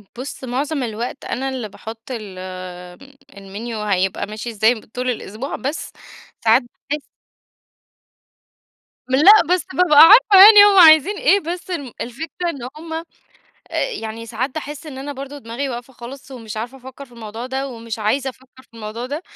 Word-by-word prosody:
بُص 260 +2 -8
معظم 275 +3 -2
الوقت 235 +3 -5
أنا 270 +1 -3
اللي 250 -5 -5
باحُط 225 +3 -10
ال 210 -6 -7 0.9
الmenu 200 +3 -8 0.2
هيبقى 190 +1 -1
ماشي 215 +3 -6
إزاي 220 +1 +2
ب 220 - -12
طول 250 +3 -4
الأسبوع 235 +2 -5
بس 280 +4 -5 0.5
ساعات 225 0 +5 0.3
باحس 295 0 -2 2.1
لأ، 280 +9 +6 0.2
بس 365 - -1
بابقى 335 -5 +4
عارفة 400 +2 +9
يعني 420 -1 +10
هو 405 -1 +4
عايزين 330 +3 +7
إيه 400 - +3
بس 350 +1 -6
الم 285 -8 -5
الفكرة 320 +8 -5
إن 270 -7 -6
هُم، 320 +1 -8
آآ، 325 +1 -4 0.9
يعني 225 - -7
ساعات 240 +3 -3
باحس 300 0 -7
إن 275 -4 -8
أنا 285 +2 -6
برضه 280 +1 -8
دماغي 250 +2 -5
واقفة 245 +1 -7
خالص 260 +3 -11
ومش 225 -4 -9
عارفة 235 +4 -5
أفكر 260 +2 -11
في 245 - -22
الموضوع 225 +1 -8
ده 265 +1 -3
ومش 230 -3 -7
عايزة 265 +6 -1
أفكر 260 0 -20
في - - -29
الموضوع 225 +2 -6
ده، 290 +5 -5
260 Hz, 160 wpm, -19 LUFS, 230-295 Hz, 2.1 s, يعني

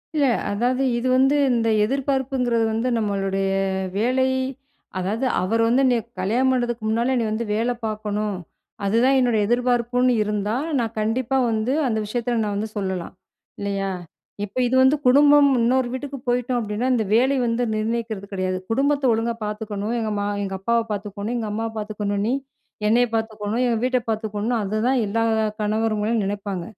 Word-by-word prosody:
இல்ல. 295 -2 +3 0.3
அதாவது 245 +6 0
இது 240 +2 -1
வந்து 270 +2 +4 0.2
இந்த 230 -2 +1
எதிர்பார்ப்புங்கிறது 265 -1 0
வந்து 225 +3 -1
நம்மளுடைய 195 -2 -1 0.5
வேலை, 255 +4 +2 0.7
அதாவது 215 +8 -1 0.2
அவர் 225 +5 +1
வந்து 255 +4 +3
என்னைய 245 -3 +3 0.2
கல்யாணம் 240 +8 +2
பண்ணுறதுக்கு 240 -2 -1
முன்னால 235 +4 +1
"நீ - - +1
வந்து 230 +2 -2
வேல 230 +3 +1
பார்க்கணும். 210 -1 -2 0.5
அதுதான் 240 +7 +3
என்னுடைய 240 -4 +2
எதிர்பார்ப்புன்னு" 245 +1 +2
இருந்தா, 210 +1 -1 0.2
நான் 230 -1 -2
கண்டிப்பா 240 +4 0
வந்து 220 +4 0
அந்த 220 - 0
விஷயத்தில 235 +2 -1
நான் 205 -1 -2
வந்து 215 +2 -2
சொல்லலாம். 190 -3 -3 0.5
இல்லயா! 200 -1 -2 0.5
இப்ப 205 +4 -13
இது 260 - 0
வந்து 265 +3 +5
குடும்பம் 285 +2 +6
இன்னொரு 250 +1 +2
வீட்டுக்கு 275 +1 -5
போயிட்டோம் 245 0 0
அப்பிடின்னா, 220 +2 -2
இந்த 230 - +1
வேலை 260 +4 +3
வந்து 235 +1 0
நிர்ணயிக்கிறது 220 -2 -3
கிடையாது. 185 -1 -1
"குடும்பத்த 280 +4 +1
ஒழுங்கா 230 +1 -1
பார்த்துக்கணும். 210 +1 -3
எங்க 220 -1 -2
மா 205 - -1 0.2
எங்க 195 -1 -3
அப்பாவ 235 +4 +1
பார்த்துக்கணும், 205 +2 -4
எங்க 220 -2 -3
அம்மாவ 225 +1 -2
பார்த்துக்கணும். 210 -1 -2
நீ 245 - +1 0.5
என்னைய 245 +3 +4
பார்த்துக்கணும். 220 +1 -2
எங்க 230 -2 +1
வீட்ட 255 0 +2
பார்த்துக்கணும்." 220 +1 -1
அதுதான் 220 +6 +1
எல்லா 225 +3 0 0.4
கணவர்ங்களும் 215 +1 0
நினைப்பாங்க. 200 -2 -3
225 Hz, 150 wpm, -23 LUFS, 210-250 Hz, 0.7 s, குடும்பம்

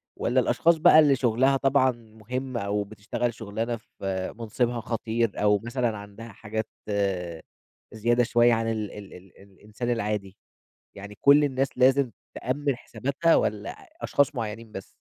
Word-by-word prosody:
والّا 125 +2 +1
الأشخاص 145 +8 +3
بقى 155 0 +7
اللي 145 -3 +5
شُغلها 130 +2 +2
طبعًا 135 -1 +3
مُهم 120 +3 -6
أو 105 -1 -1
بتشتغل 110 +4 -3
شُغلانة 110 +2 -3
في 95 -4 -5
منصبها 120 +1 -1
خطير 115 0 -1
أو 105 0 +4
مثلًا 120 -2 -1
عندها 105 +3 -10
حاجات 110 +2 -5 1.3
زيادة 120 +3 +2
شوية 120 0 +4
عن 115 0 0
ال 110 -2 -3
ال 100 -2 -10
ال 90 +1 -14
الإنسان 105 +5 -7
العادي؟ 105 -4 -3 0.6
يعني 100 +1 -10
كُلّ 145 +1 +6
الناس 135 -1 +1
لازم 130 -1 +4 0.2
تأمن 140 +2 -2
حساباتها 140 +6 0
والّا - - 0 0.3
أشخاص 145 0 +1
مُعينين 115 -1 -5
بس؟ 95 -2 -7
115 Hz, 140 wpm, -26 LUFS, 105-130 Hz, 1.3 s, بقى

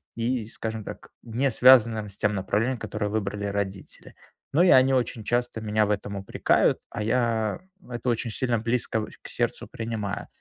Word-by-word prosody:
И, 115 -1 -1
скажем 110 -1 -5
так, - - -9
не 120 +4 0
связанным 115 -3 +5
с 100 - -12
тем 105 0 +1
направлением, 105 +6 0
которое 105 -2 -3
выбрали 105 -1 -2
родители. 100 -1 -5 0.4
Но 165 - +5
и 185 - +5
они 130 -2 +6
очень 120 -3 0
часто 120 +1 0
меня 110 0 +1
в - - -4
этом 100 0 -2
упрекают. 100 0 +2
А 105 -2 -4
я 115 0 0 0.3
это 120 0 -5
очень 115 0 -1
сильно 120 0 0
близко 115 -1 -1
в 110 - -5
к - - -10
сердцу - - -2
принимаю. 110 -3 -4
110 Hz, 175 wpm, -26 LUFS, 105-120 Hz, 0.4 s, они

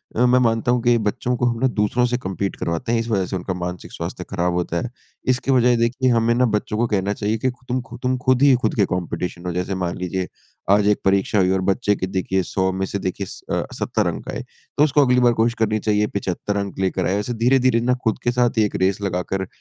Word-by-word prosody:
अ, 120 - +3
मैं 125 +1 +4
मानता 115 +1 +1
हूँ 125 -1 +2
कि 120 -1 +4
बच्चों 125 +3 -1
को 120 - 0
हम 120 -1 0
ना 130 - +4
दूसरों 120 +4 +2
से 125 - +1
कम्पीट 95 -3 -3
करवाते 85 +9 -3
हैं 115 - +2
इस 115 - -3
वजह 95 -4 +1
से 95 - -4
उनका 95 +1 -3
मानसिक 90 0 -6
स्वास्थ्य - - -5
खराब 90 -2 0
होता 85 -1 -1
है। 125 - -4 0.4
इसकी 130 +2 -2
बजाए 125 -1 +4
देखिए 125 +3 +1
हमें 115 0 +3
ना 125 +1 +3
बच्चों 105 +1 -2
को 120 +1 +1
कहना 100 +1 +1
चाहिए 105 +2 -1
कि 130 +4 0
ख़ु 125 +1 -22
तुम 125 +1 -1
ख़ु 120 - -8
तुम 130 0 +1
ख़ुद 130 -1 +3
ही 140 - +7
ख़ुद - - 0
के 100 -3 +3
कॉम्पिटिशन 90 0 -4
हो। 90 - -1
जैसे 90 +2 -2
मान 85 - -2
लीजिए 90 0 -3 0.5
आज 105 0 +2
एक 105 - +3
परीक्षा 100 +1 +2
हुई 95 -1 +3
और 95 0 +1
बच्चे 105 0 +2
के 95 - -3
देखिए 95 0 0
100 95 -1 +1
में 95 +1 -2
से 100 - -4
देखिए 95 +1 -3
स - - -9
अ, - - 0
70 - - -1
अंक - - -4
आए। - - -4 0.4
तो 145 - +5
उसको 145 -1 +4
अगली 125 0 +3
बार 120 -1 +5
कोशिश 115 +1 +2
करनी 110 -1 +1
चाहिए 105 0 +1
75 100 +1 -2
अंक 100 -1 -4
लेकर 95 -1 0
आए। 95 +2 +1
ऐसे 120 +4 -3
धीरे-धीरे 130 -2 +4
ना 125 +1 +2
ख़ुद 110 - 0
के 120 - +2
साथ 120 -1 +1
एक 105 - -4
रेस 95 +1 0
लगाकर 95 0 -2
105 Hz, 255 wpm, -21 LUFS, 95-120 Hz, 0.5 s, ही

